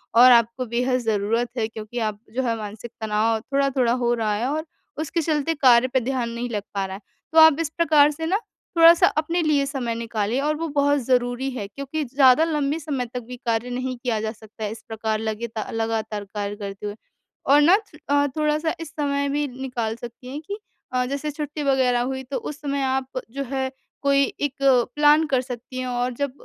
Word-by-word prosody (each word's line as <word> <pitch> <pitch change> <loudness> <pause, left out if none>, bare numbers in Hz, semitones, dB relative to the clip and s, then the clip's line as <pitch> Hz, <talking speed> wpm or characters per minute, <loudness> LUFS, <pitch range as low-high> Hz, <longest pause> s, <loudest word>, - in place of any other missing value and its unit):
और 250 +2 +9
आपको 235 +2 +3
बेहद 250 +2 0
ज़रूरत 225 +1 0
है 220 - +1
क्योंकि 220 +2 -6
आप 215 -2 -2 0.2
जो 260 - +1
है 230 -2 0
मानसिक 215 +2 -7
तनाव 220 +1 +1
थोड़ा-थोड़ा 270 0 +1
हो 240 0 +3
रहा 220 -3 0
है 230 +5 -1
और 310 +2 -2 0.4
उसके 325 +2 -1
चलते 310 0 0
कार्य 255 -3 +5
पे 260 - +4
ध्यान 250 -1 -2
नहीं 235 +1 -4
लग 210 -3 -2
पा 195 -1 -1
रहा 190 0 -6
है, 200 - -10 0.3
तो 320 - +7
आप 320 -2 +8
इस 325 -2 -1
प्रकार 300 -3 +5
से 320 +2 -5
ना 370 +5 +2 0.4
थोड़ा-सा 335 +2 +8
अपने 330 +3 +1
लिए 300 -3 +2
समय 255 -5 -3
निकालें 230 0 -1
और 300 +2 +1
वो 330 - -2
बहुत 285 -1 +2
ज़रूरी 245 +1 +1
है 225 -6 -5
क्योंकि 280 +7 -4
ज़्यादा 265 +3 +5
लंबे 300 -1 0
समय 285 -5 -3
तक 250 - -2
भी 250 0 -7
कार्य 230 +1 0
नहीं 255 +1 -3
किया 235 -3 -1
जा 220 0 -2
सकता 220 0 -9
इस 220 +2 -7
प्रकार 220 -1 -2
लगेता 220 0 -4
लगातार 220 -2 -2
कार्य 205 0 -3
करते 200 -1 -7
हुए 205 0 -4 0.6
और 295 - +7
ना 345 +6 +6
च 410 -8 -13
अ, 285 0 +3
थोड़ा-सा 305 +1 +1
इस 330 -2 -6
समय 280 -2 -1
भी 290 +1 0
निकाल 250 -4 -4
सकती 240 +1 -10
हैं 280 +4 -6
कि 405 +1 -4 0.4
अ, 250 0 +1
जैसे 280 +3 -3
छुट्टी 295 0 -5
वगैरह 260 -3 +2
हुई 265 +1 -3
तो - - 0
उस 295 - -7
समय 280 -1 -2
आप 260 0 -1
जो 275 +1 -3
है 265 -1 -1 0.3
कोई 280 0 +4 0.2
एक 290 -2 -1 0.4
प्लान 295 +1 +5
कर 265 -3 +2
सकती 250 0 -8
हैं 255 - -3
और 245 0 -1
जब 280 +2 -2
255 Hz, 205 wpm, -23 LUFS, 230-285 Hz, 0.6 s, और